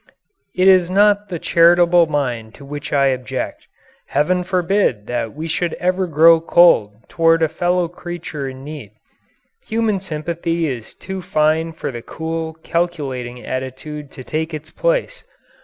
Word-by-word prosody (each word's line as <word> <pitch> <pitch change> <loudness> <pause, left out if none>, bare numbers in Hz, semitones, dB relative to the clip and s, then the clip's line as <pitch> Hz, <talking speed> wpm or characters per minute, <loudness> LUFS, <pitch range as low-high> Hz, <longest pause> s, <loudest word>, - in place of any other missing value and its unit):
It 185 +1 +3
is 185 -2 +5
not 205 +1 +3
the 175 - -3
charitable 170 +1 +4
mind 125 -7 -2
to 140 - -13
which 145 0 -7
I 140 -1 +3
object. 130 0 -4 0.4
Heaven 180 +6 +1
forbid 180 - 0
that 120 -1 -3
we 160 +2 -5
should 170 +2 -1
ever 185 +1 0
grow 165 +1 +6
cold 165 -12 +4
toward 165 0 +3
a - - +4
fellow 175 +2 0
creature 170 -5 -6
in 130 0 -10
need. 140 -8 -9 0.7
Human 220 -3 0
sympathy 165 -1 -3
is 120 -5 -6
too 190 -1 -6
fine 155 0 +1
for 160 - -5
the 120 -2 -7
cool, 160 +3 -5
calculating 135 -8 -3
attitude 130 +3 -5
to 130 - -9
take 160 +3 -3
its 155 +1 -9
place. - - -1
160 Hz, 145 wpm, -19 LUFS, 140-175 Hz, 0.7 s, grow